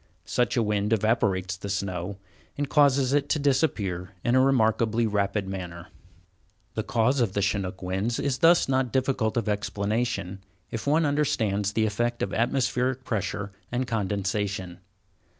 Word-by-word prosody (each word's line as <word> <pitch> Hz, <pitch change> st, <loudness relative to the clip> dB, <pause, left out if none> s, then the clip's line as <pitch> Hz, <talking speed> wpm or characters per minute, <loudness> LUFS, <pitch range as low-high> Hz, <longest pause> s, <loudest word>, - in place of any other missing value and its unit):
Such 125 Hz, -1 st, 0 dB
a 115 Hz, -, +3 dB
wind 105 Hz, 0 st, 0 dB
evaporates 100 Hz, -4 st, +1 dB
the 100 Hz, +2 st, -7 dB
snow, 95 Hz, -1 st, -3 dB, 0.4 s
and 145 Hz, 0 st, -1 dB
causes 140 Hz, -3 st, +3 dB
it 145 Hz, -1 st, +1 dB
to -, -, +2 dB
disappear 105 Hz, -, 0 dB
in 120 Hz, -, +1 dB
a 130 Hz, -, +5 dB
remarkably 115 Hz, -3 st, +2 dB
rapid 100 Hz, -1 st, 0 dB
manner. 90 Hz, -2 st, -6 dB, 0.8 s
The 110 Hz, -, -1 dB
cause 115 Hz, +4 st, +1 dB
of 110 Hz, -5 st, 0 dB
Chinook 95 Hz, -1 st, -1 dB
winds 95 Hz, +6 st, -1 dB
is 135 Hz, -2 st, -1 dB
thus 170 Hz, +1 st, +5 dB
not 130 Hz, -2 st, +1 dB
difficult 130 Hz, -4 st, 0 dB
of 115 Hz, -, 0 dB
explanation, 105 Hz, -1 st, -1 dB, 0.3 s
if 115 Hz, +4 st, -5 dB
one 155 Hz, +3 st, +3 dB
understands 110 Hz, -9 st, 0 dB
the 110 Hz, 0 st, +2 dB
effects 120 Hz, +3 st, -1 dB
of 100 Hz, -, -3 dB
atmospheric 125 Hz, +1 st, 0 dB
pressure 100 Hz, -3 st, -3 dB, 0.2 s
and 125 Hz, +1 st, 0 dB
condensation. 100 Hz, -4 st, -2 dB
110 Hz, 145 wpm, -26 LUFS, 100-130 Hz, 0.8 s, a